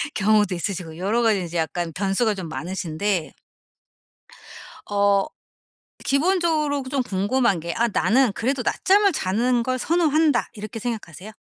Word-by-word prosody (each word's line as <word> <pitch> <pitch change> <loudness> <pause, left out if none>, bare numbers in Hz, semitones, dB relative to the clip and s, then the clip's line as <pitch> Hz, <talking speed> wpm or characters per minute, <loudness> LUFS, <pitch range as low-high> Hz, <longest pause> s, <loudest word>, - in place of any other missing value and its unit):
경우도 210 -1 +3
있으시고 170 -3 -5
여러 205 +7 0
가지 210 -5 +2
이제 170 0 -5
약간 165 +1 -2
변수가 200 +3 0
좀 185 -3 -6
많으신데 175 +1 -3 1.6
어 200 -1 +3 0.8
기본적으로 305 -2 +1
그 260 - -9
좀 270 -2 0
궁금한 205 0 +1
게 170 +1 -5
'아 235 +1 +2
나는 240 +2 +2
그래도 250 +5 -1
낮잠을 400 - +3
자는 235 +3 0
걸 255 +1 -1
선호한다.' 315 0 +2
이렇게 215 +1 -7
생각하세요? 215 -4 -6
215 Hz, 310 characters per minute, -23 LUFS, 190-260 Hz, 1.6 s, 경우도